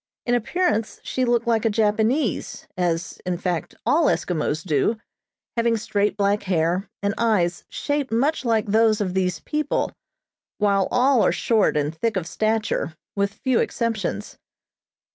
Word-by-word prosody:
In 245 - +1
appearance 240 -2 0
she 255 - -1
looked 240 0 +1
like 230 -2 +2
a 225 - +3
Japanese, 220 +4 0
as, 175 -1 -2
in 180 -1 -2
fact, 175 -3 -3
all 320 +2 +3
Eskimos 155 - 0
do, 165 +7 +1 0.6
having 230 -1 +2
straight 210 -2 0
black 200 0 +2
hair, 180 0 0
and 200 0 +1
eyes 195 -7 +1
shaped 290 -3 -2
much 275 +8 +1
like 225 -3 +1
those 220 +1 +3
of 190 -3 -1
these 180 -3 0
people, 300 0 -1 0.7
while 200 -2 +2
all 250 -1 +3
are - - +4
short 220 -9 +2
and 150 +1 0
thick 210 +5 -1
of 180 - -2
stature, 215 -2 -1 0.2
with 200 0 +1
few 250 +4 0
exceptions. 215 - -2
210 Hz, 145 wpm, -23 LUFS, 185-235 Hz, 0.7 s, are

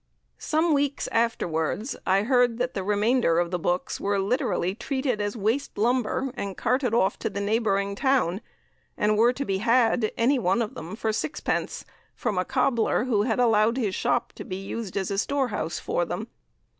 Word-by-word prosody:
"Some 320 +1 +1
weeks 285 -1 0
afterwards 220 - -1
I 195 +2 +3
heard 245 -1 +3
that 250 +1 -1
the 195 - -3
remainder 210 -2 +2
of 175 0 +1
the 180 - -1
books 175 +2 -1
were 200 0 0
literally 195 -3 0
treated 260 0 -2
as 205 +2 -2
waste 225 +7 -1
lumber, 250 +3 +1
and 195 -1 -5
carted 250 -1 +1
off 190 -5 +2
to - - -2
the 200 - -5
neighbouring 200 -1 0
town, 225 - +1 0.6
and 210 0 +2
were 230 +3 +5
to 275 +3 -4
be 195 -4 -1
had, 230 0 +3
any 255 +4 +3
one 230 +3 +2
of 215 - -6
them, 170 +6 -7
for 220 0 -1
sixpence, 290 - -2 0.3
from 190 - -1
a 180 - 0
cobbler 255 -4 +1
who 225 -5 +2
had 225 +2 0
allowed 225 0 +3
his 215 -7 0
shop - - 0
to - - -6
be 185 - -5
used 195 +1 -5
as 195 0 -1
a 195 - 0
store 275 +2 0
house 205 - -3
for - - -1
them. - - -4
225 Hz, 185 wpm, -26 LUFS, 200-250 Hz, 0.6 s, were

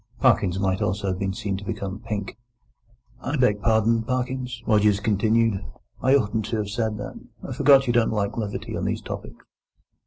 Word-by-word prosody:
Parkins 90 0 +3
might 95 -1 0
also 100 +1 -1
have 95 0 -2
been 100 -1 -1
seen 100 -1 -3
to 100 - -8
become 100 -2 -4
pink. 105 -3 -4 0.9
"I 135 +4 -2
beg 105 -6 +2
pardon, 115 +1 +3
Parkins," 125 0 -3
Rogers 105 -2 +3
continued; 110 0 +2 0.4
"I 130 +2 +4
oughtn't 110 -4 +1
to 115 +1 -2
have 105 -1 -2
said 110 0 -1
that. 105 - -7 0.3
I - - -4
forgot 140 -1 +5
you 120 - +1
didn't 120 -1 +3
like 100 -2 -1
levity 105 -3 -4
on - - -2
these - - -2
topics." - - -8
110 Hz, 180 wpm, -24 LUFS, 100-120 Hz, 0.9 s, forgot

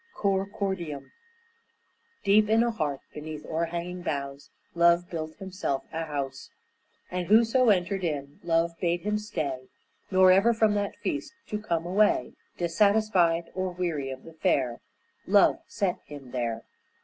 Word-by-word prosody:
COR 195 -1 +1
CORDIUM 190 -9 -4 1.1
Deep 210 +1 +4
in 225 +1 +5
a 235 - +1
heart, 150 -10 -2
beneath 150 0 -7
o'er 165 +1 -1
hanging 175 +2 -5
boughs, 140 -3 -4 0.2
Love 170 +1 +4
built 160 -2 -4
himself 185 -8 -3
a 165 0 -2
house, 140 -3 -5 0.6
And 180 -1 -2
whoso 230 +3 +5
entered 190 0 +1
in, 145 -4 -3
Love 170 0 +1
bade 175 -1 +1
him 210 +2 -1
stay, 145 -11 -4 0.4
Nor 185 -1 +6
ever 210 +5 +5
from 220 -2 +3
that 205 -1 -1
feast 300 -3 -2 0.2
to 210 - -2
come 170 -6 -2
away 205 +4 +2 0.2
Dissatisfied 175 -2 +2
or 185 0 -1
weary 165 -6 -2
of 130 0 -7
the 165 - -12
fare 130 -6 0 0.5
Love - - +5
set - - -1
him 140 -4 -10
there. 115 -3 -2
170 Hz, 145 wpm, -27 LUFS, 150-200 Hz, 1.1 s, Nor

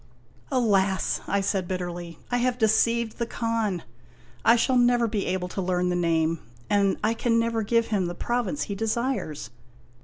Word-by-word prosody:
" - - -30
Alas! 200 -7 +2
" - - -20
I 200 - +1
said 190 -2 -1
bitterly, 175 -2 -5
" - - -26
I 245 - +2
have 245 0 +1
deceived 230 0 +2
the 235 - -1
Khan! 225 -6 -1 0.6
I 230 - +6
shall 255 +2 +2
never 245 -1 +4
be 210 -2 -2
able 185 -1 -1
to 195 - -3
learn 180 -1 0
the 180 - 0
name 165 -2 +1 0.3
and 200 -1 +3
I 220 +1 +2
can 230 0 +1
never 230 -1 +1
give 230 +2 +1
him 195 -5 +1
the 175 - -5
province 245 +6 -1
he 200 - -4
desires. 225 - -2
215 Hz, 185 wpm, -26 LUFS, 180-235 Hz, 0.6 s, I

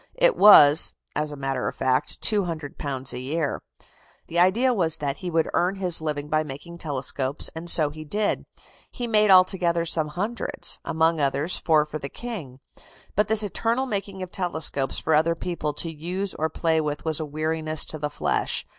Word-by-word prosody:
It - - +4
was, 155 -7 +7 0.2
as 150 0 -1
a - - -6
matter 135 -2 -3
of - - -4
fact, 130 -1 -1
£200 150 - -2
a 125 - -5
year. 145 +4 -3 0.7
The 170 - 0
idea 225 +9 +3
was 170 -7 +1
that 140 -1 -3
he 180 - -5
would 165 -1 +1
earn 180 +3 +1
his 180 -4 0
living 150 -2 -3
by 155 +1 +1
making 155 +4 -9
telescopes, 140 -2 -2
and 165 +2 -4
so 160 -2 +6
indeed 155 - -13
he - - -6
did. 205 +7 -1 0.4
He 245 - -5
made 215 -2 +2
altogether 185 -2 +4
some 160 -2 +1
hundreds. 205 +10 -2
Among 160 0 +1
others, 140 +4 +1
four 155 -2 +2
for 155 0 -6
the 140 - -6
King. 165 - -8 0.6
But 210 +1 +2
this 220 0 +6
eternal 230 +5 -1
making 200 -5 -4
of 180 - -9
telescopes 160 -7 -1
for 160 - 0
other 160 +2 +3
people 170 -3 -3
to 165 +3 -4
use 180 +5 -1
or 160 +1 -2
play 160 0 0
with 150 0 -4
was 160 -1 +1
a - - -2
weariness 155 +1 0
to 155 - -6
the 150 0 -2
flesh. - - -1
160 Hz, 185 wpm, -24 LUFS, 150-185 Hz, 0.7 s, was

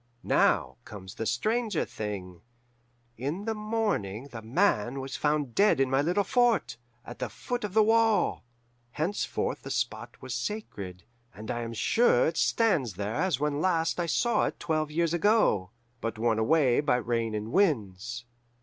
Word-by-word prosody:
"Now - - +2
comes 95 -2 -10
the 115 -1 -4
stranger 215 - 0
thing. 95 -5 -6 0.8
In 155 +11 -3
the 225 - 0
morning 210 - -2
The 115 - -7
Man 125 - +1
was 135 0 -5
found 150 -4 0
dead 205 - +4
in 135 -1 +2
my 135 +1 +3
little 180 +7 +1
fort, 245 - +2 0.3
at - - -9
the - - -3
foot 245 -2 -4
of 205 -1 -4
the 220 - +6
wall. 225 0 +2 0.5
Henceforth 175 +7 -2
the - - -8
spot - - -3
was - - -6
sacred, 100 - -5 0.3
and 110 +1 -6
I 120 - -3
am 115 0 -5
sure 225 - +3
it 160 0 -1
stands 165 - +2
there 100 +3 -3
as 170 0 0
when 150 0 -1
last 165 -2 +1
I 170 - 0
saw 235 +8 +2
it - - -6
twelve 155 -2 -1
years 165 +1 0
ago, 175 - +3 0.3
but 115 -1 -3
worn 110 0 +1
away 135 +1 +3
by 145 -3 +2
rains 115 -2 -1
and 105 +2 -4
winds. 120 - 0
145 Hz, 165 wpm, -28 LUFS, -, 0.8 s, the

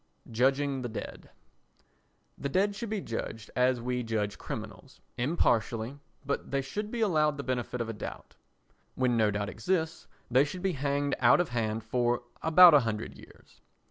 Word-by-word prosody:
Judging 135 +3 +1
the 120 - -4
Dead 110 - -7 1.1
The 140 - -4
dead 195 +6 +2
should 230 +1 -5
be 210 -2 -2
judged 115 -3 -5
as 125 0 +3
we 125 +1 -2
judge 105 -4 -2
criminals, - - -8 0.2
impartially, 120 -2 0 0.3
but 140 - -2
they 140 0 0
should 210 +10 -4
be 235 0 -3
allowed 155 -8 +2
the 140 - -4
benefit 125 -1 -2
of 115 - -2
a 115 - -4
doubt. 105 - -8 0.6
When 125 -2 +1
no 110 -2 +3
doubt 100 0 -2
exists 160 - -2 0.2
they 130 +3 +5
should 180 +5 -6
be 190 -2 +1
hanged 140 0 -1
out - - +6
of 175 - +1
hand 110 -2 -2
for 120 +1 0 0.2
about 170 +1 +8
a 150 - +8
hundred 115 -4 -3
years. - - -18
130 Hz, 170 wpm, -29 LUFS, 115-155 Hz, 1.1 s, about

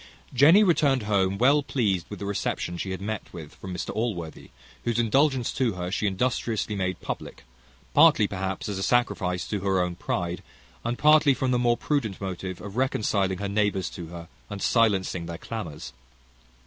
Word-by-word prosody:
Jenny 155 - +7
returned 145 - +3
home 100 -2 +1
well 140 +6 +4
pleased 105 - -1
with 105 - -6
the 100 - -6
reception 100 -3 -2
she 90 +3 -4
had 95 +1 -5
met 110 0 -4
with 80 -3 -9
from 95 - -9
Mr 90 - -4
Allworthy, 100 -8 -4 0.3
whose 120 -1 -1
indulgence 130 +2 +2
to 125 -5 0
her 90 0 -4
she 105 +2 0
industriously 110 +1 -1
made 95 -2 -2
public; - - -6 0.5
partly 105 - +6
perhaps 95 -1 -4
as 100 -2 -3
a - - -3
sacrifice 95 -6 0
to 105 - -2
her 95 -1 +1
own 90 -1 0
pride, 85 0 -3 0.4
and 120 +1 -2
partly 150 -2 +5
from 130 0 -1
the 125 - +2
more 120 -1 +2
prudent 125 -10 -1
motive 95 -1 -5
of 100 +2 -8
reconciling 105 -7 +1
her 100 +2 -3
neighbours 100 -2 0
to 85 -2 -7
her, 85 0 -9 0.2
and 100 -2 -5
silencing 95 -7 +2
their 85 -1 -5
clamours. 90 -8 -7
100 Hz, 175 wpm, -26 LUFS, 95-120 Hz, 0.5 s, Jenny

